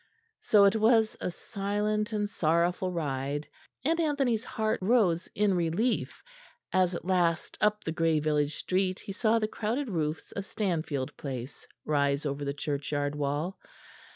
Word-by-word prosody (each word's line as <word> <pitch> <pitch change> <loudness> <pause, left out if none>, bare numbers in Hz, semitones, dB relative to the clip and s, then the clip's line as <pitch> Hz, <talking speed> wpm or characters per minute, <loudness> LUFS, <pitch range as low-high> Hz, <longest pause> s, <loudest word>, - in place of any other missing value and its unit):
So 210 -2 +5
it 200 +2 +5
was 220 0 +4
a - - -1
silent 210 +3 -2
and 210 -1 0
sorrowful 175 +1 +1
ride; 145 -3 -2 0.4
and 330 +3 +2
Anthony's 275 -8 +1
heart 220 -2 -1
rose 185 -5 +3
in 205 -1 +3
relief 180 +8 0 0.5
as 185 -1 +3
at 170 - -6
last 175 -3 +1
up 210 0 +2
the 160 - -2
grey 165 -1 +2
village 150 -1 +1
street 185 0 -1
he - - -7
saw 220 +3 +2
the 215 -1 +1
crowded 230 +4 -2
roofs 155 -3 -2
of 200 - -4
Stanfield 160 - -2
Place 130 -2 -6 0.2
rise 140 -1 +1
over 145 0 -2
the 140 - -1
churchyard 145 0 -2
wall. 150 +5 -2
180 Hz, 150 wpm, -29 LUFS, 150-210 Hz, 0.5 s, So